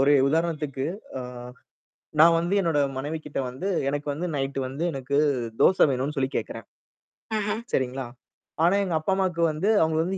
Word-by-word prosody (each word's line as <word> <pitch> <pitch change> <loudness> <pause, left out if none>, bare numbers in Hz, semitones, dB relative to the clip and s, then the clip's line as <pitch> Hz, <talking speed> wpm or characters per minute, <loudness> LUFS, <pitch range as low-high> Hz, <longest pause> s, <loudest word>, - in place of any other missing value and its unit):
ஒரே 145 +1 +5
உதாரணத்துக்கு 150 -4 -1 0.3
ஆ. 130 - -4 1.0
நான் 165 +1 +8
வந்து 175 +4 0
என்னோட 165 -5 +1 0.2
மனைவி 145 +4 -3
கிட்ட 145 - -6
வந்து 135 +10 -4 0.2
எனக்கு 145 +1 -2
வந்து 170 +5 -3
நைட் 135 -1 -2
வந்து 135 +5 -5
எனக்கு 135 +1 -2 0.4
தோசை 185 - +6
வேணும்னு 135 +3 -1
சொல்லி 130 -1 +1
கேட்கறேன். - - -4 0.7
ம்ஹ்ம். 210 +2 -1
சரிங்களா? 130 0 -1 0.6
ஆனா 175 +4 +5
எங்க 180 -4 -1
அப்பா 155 +5 -1
அம்மாவுக்கு 185 -3 0
வந்து 160 +8 -1
அவங்க 160 0 0
வந்து 185 +3 -2
150 Hz, 160 wpm, -25 LUFS, 135-175 Hz, 1.0 s, நான்